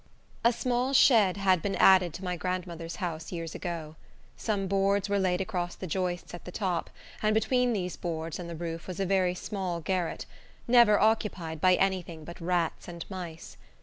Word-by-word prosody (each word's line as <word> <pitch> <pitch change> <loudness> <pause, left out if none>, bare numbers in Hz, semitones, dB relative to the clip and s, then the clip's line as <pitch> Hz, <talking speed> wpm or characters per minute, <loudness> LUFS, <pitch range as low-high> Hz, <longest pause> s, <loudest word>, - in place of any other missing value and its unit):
A 235 - +6
small 250 +2 0
shed 215 -8 +5
had 190 -3 +3
been 195 +2 -1
added 185 -2 +6
to 190 - -8
my 180 -1 -2
grandmother's 175 -1 -4
house 165 -4 -4
years 165 -2 -5
ago. 165 -3 -5 0.4
Some 205 -3 -1
boards 195 +1 +1
were 200 0 +2
laid 185 -1 +1
across 180 -3 -3
the - - -7
joists 180 +1 -2
at 175 - -8
the 180 - -8
top, 180 -4 -2 0.3
and 215 0 +2
between 250 +2 +2
these 180 -5 -2
boards 165 -1 -4
and 175 -1 -6
the 170 - -5
roof 165 0 -5
was 185 -1 -6
a 195 - +1
very 185 -1 +2
small 180 -2 -3
garret, 180 0 -2 0.4
never 235 -4 +6
occupied 195 -7 0
by 185 -1 +6
any 190 -1 +2
thing 165 -2 -10
but 170 +2 -10
rats 170 -1 -1
and 170 -2 -7
mice. 175 -4 -7
185 Hz, 185 wpm, -29 LUFS, 170-200 Hz, 0.4 s, A